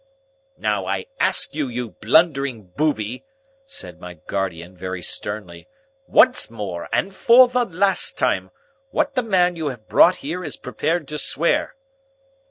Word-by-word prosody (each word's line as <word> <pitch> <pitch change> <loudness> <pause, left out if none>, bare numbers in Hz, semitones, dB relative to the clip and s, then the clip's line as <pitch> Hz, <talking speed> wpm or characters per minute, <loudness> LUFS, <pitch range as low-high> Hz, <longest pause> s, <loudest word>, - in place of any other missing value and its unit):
"Now, - - -1
I - - -2
ask - - +3
you, 150 -3 -2
you 120 -2 -5
blundering 135 - +1
booby," 125 -6 -1 0.4
said 280 +1 -8
my 90 -1 -9
guardian, 90 0 -5
very 90 0 -6
sternly, 100 -4 -3 0.4
"once 255 0 +4
more 100 -7 -6
and 175 +12 0
for 240 +5 +6
the 250 0 0
last 195 0 +1
time, - - 0 0.4
what - - 0
the 255 - +1
man 180 -6 +2
you 160 -2 -3
have 120 -6 -7
brought 180 - +5
here 175 +5 -4
is - - -4
prepared 155 +4 -2
to 150 0 -4
swear?" 165 +4 +1
140 Hz, 145 wpm, -21 LUFS, -, 0.4 s, for